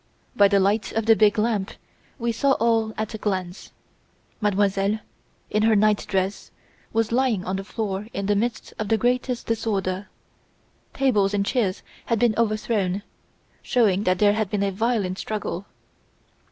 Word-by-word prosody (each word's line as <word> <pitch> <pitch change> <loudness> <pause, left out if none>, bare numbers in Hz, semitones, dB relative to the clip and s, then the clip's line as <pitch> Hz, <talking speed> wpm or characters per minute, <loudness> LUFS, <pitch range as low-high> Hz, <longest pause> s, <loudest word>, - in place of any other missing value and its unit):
By 205 -3 +6
the 200 0 +3
light 200 +3 +1
of 225 -1 -1
the 225 0 +6
big 210 -1 +4
lamp 210 -3 0 0.5
we 235 -1 -1
saw 270 +4 +2
all 225 -2 +1
at 220 +1 -3
a 220 - -5
glance. 185 -3 -3 0.7
Mademoiselle, 200 0 +1 0.5
in 210 - +2
her 220 0 +4
night 210 0 +2
dress, 190 0 -1 0.4
was 225 0 0
lying 240 -6 +1
on 185 - -2
the 195 - -4
floor 205 0 -4
in 200 - -3
the 205 +1 +2
midst 230 +3 -2
of 215 - -2
the 225 - +2
greatest 250 +1 0
disorder. 200 -4 -2 0.9
Tables 210 -7 +2
and 200 -1 +1
chairs 205 -6 0 0.2
had 230 - +1
been 235 0 +3
overthrown, 215 -3 0 0.6
showing 210 -7 +2
that 185 0 +2
there 205 +1 +4
had 215 -2 -1
been 200 0 0
a 200 - 0
violent 200 -3 -1
struggle. 205 -3 -4
210 Hz, 160 wpm, -24 LUFS, 195-225 Hz, 0.9 s, By